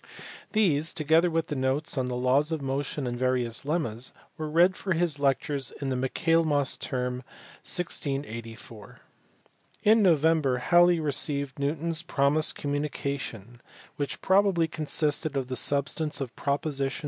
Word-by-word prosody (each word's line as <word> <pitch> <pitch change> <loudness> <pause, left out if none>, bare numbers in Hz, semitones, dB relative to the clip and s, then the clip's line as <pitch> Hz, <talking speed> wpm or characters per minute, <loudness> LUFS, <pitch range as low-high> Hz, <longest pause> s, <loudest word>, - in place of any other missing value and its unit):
These, 165 -8 +2
together 160 +3 +3
with 165 -1 -2
notes 135 +2 -1
on 130 -2 -1
the 125 - -3
laws 130 +5 +2
of 160 - -1
motion 140 +1 -3
and 120 -1 -2
various 125 -1 -1
lemmas, 130 -7 -2 0.2
were 155 -2 -4
read 175 +4 +4
for 190 - -2
his 165 -3 0
lectures 140 -1 0
in 140 - -3
the 130 - -1
Michaelmas 145 +2 +1
Term, 125 -1 -3 0.5
1684. 115 - -4 0.9
In 220 +1 +5
November 160 -6 +3
Halley 175 +6 +4
received 140 -2 -1
Newton 150 +4 -1
s 165 -1 -2
promised 150 -1 +1
com 145 0 -3
munication, 140 -6 -4 0.4
which 145 -1 -4
probably 190 -3 +3
consisted 155 -1 0
of 130 -2 -3
the 130 - -2
substance 145 +3 0
of 125 -4 -5
props. 140 0 -2
145 Hz, 135 wpm, -27 LUFS, 130-160 Hz, 0.9 s, In